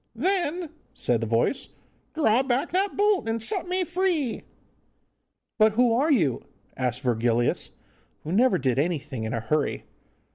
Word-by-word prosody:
'Then,' 345 - -1 0.2
said 120 -2 0
the 115 - -2
voice, 115 - 0 0.5
'draw 250 -6 +3
back 265 +4 -1
that 390 +2 0
bolt, 410 - +2
and 225 +1 -1
set 380 - -1
me 365 +1 0
free.' 350 -8 -1 1.2
'But 215 0 +5
who 240 +1 +3
are 280 +7 +2
you?' 160 - +2 0.3
asked 125 -1 -2
Virgilius, 120 -1 0 0.5
who 155 - -5
never 245 +7 +3
did 130 -1 0
anything 150 -7 -2
in 110 - -3
a - - -1
hurry. 145 +6 -1
225 Hz, 145 wpm, -25 LUFS, -, 1.2 s, But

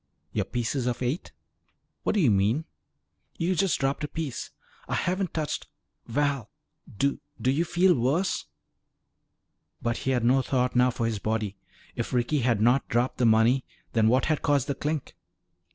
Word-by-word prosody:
"Your - - -1
pieces 120 +1 -2
of 125 +1 -1
eight." 130 +9 -2 0.7
"What - - 0
do 205 - +3
you 135 -9 +5
mean?" 105 +10 +2 0.7
"You 175 +3 +1
just 190 +1 +2
dropped 135 +2 0
a - - -1
piece." 155 -5 -4 0.4
"I - - -1
haven't 185 +1 0
touched 155 -2 -3 0.4
Val, 140 -2 0 0.5
do 140 +4 +1 0.2
do 130 - +2
you 150 +5 +2
feel 175 +2 +4
worse?" 145 +9 0 1.3
But 115 0 -1
he - - -3
had 125 -3 +1
no 130 +3 +4
thought 125 -1 0
now 125 +1 +5
for 120 -1 -2
his 110 -3 -1
body. 110 -2 -1 0.4
If 120 +1 -3
Ricky 125 +4 +1
had 120 -4 +2
not 120 +4 +3
dropped 120 +2 0
the 120 - +4
money, 115 +4 +4 0.3
then 110 -2 +4
what 125 +4 +3
had 155 -2 0
caused 145 -3 +2
the 140 - -1
clink? 150 +1 -3
130 Hz, 170 wpm, -27 LUFS, 120-150 Hz, 1.3 s, you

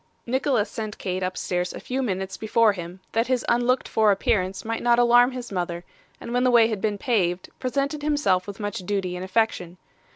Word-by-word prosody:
Nicholas 255 -3 +1
sent 215 -3 -6
Kate 185 0 -3
upstairs 180 -1 -2
a - - -7
few 260 +1 -3
minutes 190 -5 -3
before 220 0 +3
him, 180 0 -8
that 230 +1 +1
his 255 -2 0
unlooked 245 +2 +2
for 220 -1 +3
appearance 190 -1 0
might 225 0 -2
not 240 0 +3
alarm 245 +1 +6
his 250 -3 -7
mother, 175 -2 -3 0.4
and 235 - -7
when 245 0 +2
the 255 - +4
way 235 -2 +5
had 215 -4 -3
been 210 -2 0
paved, 185 -6 0
presented 280 +3 -1
himself 290 -12 +1
with 200 +1 -8
much 205 -1 -3
duty 185 -1 -2
and 180 - -5
affection. 185 -3 -1
215 Hz, 195 wpm, -24 LUFS, 185-245 Hz, 0.4 s, alarm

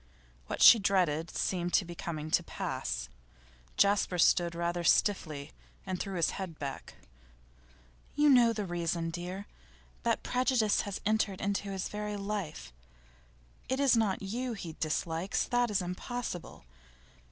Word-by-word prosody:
What - - 0
she 230 - +10
dreaded 175 -5 +1
seemed 175 -2 -2
to 190 - +3
be 175 - -7
coming 155 -2 -5
to - - +4
pass. - - -4 0.7
Jasper 200 -2 +3
stood 170 0 +3
rather 170 0 -1
stiffly, 155 -6 +1 0.3
and 185 -2 -3
threw 195 -1 -4
his 170 -2 +2
head 185 -5 -6
back. 140 -1 -6 1.2
'You 295 0 +4
know 240 -3 +6
the 210 -2 -3
reason, 170 -1 -2
dear. 180 +4 -5 0.6
That 230 -1 0
prejudice 250 -4 +2
has 200 -1 -5
entered 210 -2 +1
into 200 0 -2
his 190 -1 -3
very 210 0 -4
life. 195 - -5 1.0
It 260 +1 0
is 275 -3 +5
not 210 -4 +1
you 240 +5 -3
he 175 -6 -7
dislikes; 165 +3 -1
that 245 -1 +1
is 200 -3 0
impossible. 180 - -5
190 Hz, 140 wpm, -31 LUFS, 170-210 Hz, 1.2 s, she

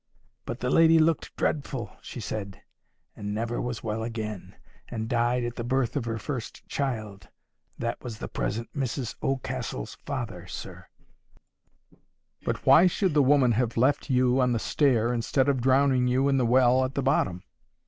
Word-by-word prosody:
But - - -5
the 125 - 0
lady 165 0 +6
looked 160 -1 +1
dreadful, 135 -6 -2
she - - -8
said, 100 -2 -5 0.5
and 105 0 -4
never 115 +2 -2
was 125 -1 -4
well 110 0 -2
again, 110 -4 -5 0.3
and 110 -2 -4
died 120 +1 +1
at 120 0 -4
the 120 - -3
birth 130 +1 0
of 135 -5 -1
her 115 -1 -2
first 125 +1 -6
child. 110 -8 -4 0.5
That 115 0 -3
was 120 -4 -6
the - - -6
present 110 - -3
Mrs 130 -3 -2
Oldcastle's 130 - -3
father, - - -5
sir." - - -8 1.6
"But - - -3
why 175 +3 +7
should 185 -1 0
the 150 - +5
woman 135 -2 +4
have 120 0 0
left 140 +5 +2
you 130 0 +3
on 125 -1 +2
the - - +1
stair, 120 -2 +2
instead 130 +3 +1
of 135 -3 +1
drowning 130 0 +3
you 130 +2 +2
in 135 - +3
the 125 -3 +2
well 130 +1 +4
at 130 +1 -3
the 140 - 0
bottom?" 95 -10 +1
125 Hz, 170 wpm, -27 LUFS, 115-135 Hz, 1.6 s, why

